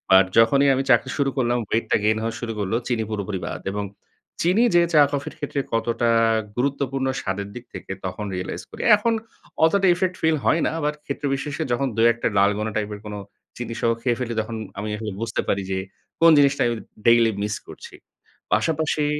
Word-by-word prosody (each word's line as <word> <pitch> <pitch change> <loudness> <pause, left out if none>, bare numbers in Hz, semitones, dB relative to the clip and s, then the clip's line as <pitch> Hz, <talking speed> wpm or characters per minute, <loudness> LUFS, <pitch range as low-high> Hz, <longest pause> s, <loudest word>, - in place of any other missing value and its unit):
আর 95 - +8
যখনই 135 +5 +5
আমি 135 - 0
চাকরি 135 - +4
শুরু 140 -1 +2
করলাম 120 -1 +1
ওয়েটটা 115 +3 0
গেইন 110 +1 +2
হওয়া 115 0 -2
শুরু 115 -2 -3
করলো। 100 +2 -1
চিনি 115 -3 0
পুরোপুরি 100 -3 -3
বাদ। - - -5
এবং 105 0 -3 0.6
চিনি 185 +7 +3
যে 175 - +7
চা 150 - +7
কফির 145 -1 -3
ক্ষেত্রে 145 -1 -3
কতটা 115 +1 +1 0.5
গুরুত্বপূর্ণ 135 0 -1
স্বাদের 100 +1 -3
দিক 125 - -8
থেকে - - -8
তখন 105 +3 -4
রিয়ালাইজ 90 0 -4
করি। - - -8
এখন 230 +3 0 0.5
অতটা 195 +3 +3
ইফেক্ট 185 +1 -1
ফিল 160 -1 +3
হয় 165 - +3
না। - - +2
আবার 150 -1 0
ক্ষেত্র 140 +1 -4
বিশেষে 140 +1 -4
যখন 135 +3 +1
২-১ 115 +1 +3
ডালগোনা 105 +2 +2
টাইপের 105 -1 -3
কোনো 105 0 -6 0.4
চিনিসহ 115 -1 -2
খেয়ে 120 0 0
ফেলি 120 -2 -3
তখন 110 +1 -6 0.2
আমি 105 - -4
আসলে 110 -1 -5
বুঝতে 115 -1 -1
পারি 100 - +1
যে 95 - 0 0.4
কোন 165 0 +8
জিনিসটা 140 0 +3
আমি 120 - 0 0.3
ডেইলি 115 -1 +5
মিস 105 0 -2
করছি। - - -11 0.6
পাশাপাশি 155 -2 +1
120 Hz, 180 wpm, -23 LUFS, 110-140 Hz, 0.6 s, আর